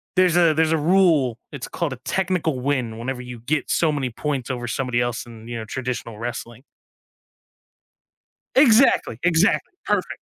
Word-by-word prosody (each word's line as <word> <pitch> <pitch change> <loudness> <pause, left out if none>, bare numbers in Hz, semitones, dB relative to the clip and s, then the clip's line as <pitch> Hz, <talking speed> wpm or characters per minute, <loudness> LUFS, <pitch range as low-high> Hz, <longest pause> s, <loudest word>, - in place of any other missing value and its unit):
there's 185 -2 +4
a 165 -3 +5
there's 160 0 +2
a 160 - +3
rule, 155 -7 +3
it's 140 -4 -6
called 165 -6 -3
a - - -8
"technical 175 -7 0
win" 125 -4 -1
whenever 125 +2 -4
you 125 -2 -8
get 145 +5 -1
so 160 -2 +2
many 140 -4 -2
points 135 +1 -3
over 125 -1 -4
somebody 120 0 -1
else 120 -1 -2
in, 115 -1 -12
you 120 0 -5
know, 110 - -5
traditional 120 -2 -5
wrestling. 120 +1 -6 1.9
Exactly, 245 - +5
exactly, 180 - +2
perfect. - - -1
135 Hz, 160 wpm, -22 LUFS, 120-165 Hz, 1.9 s, a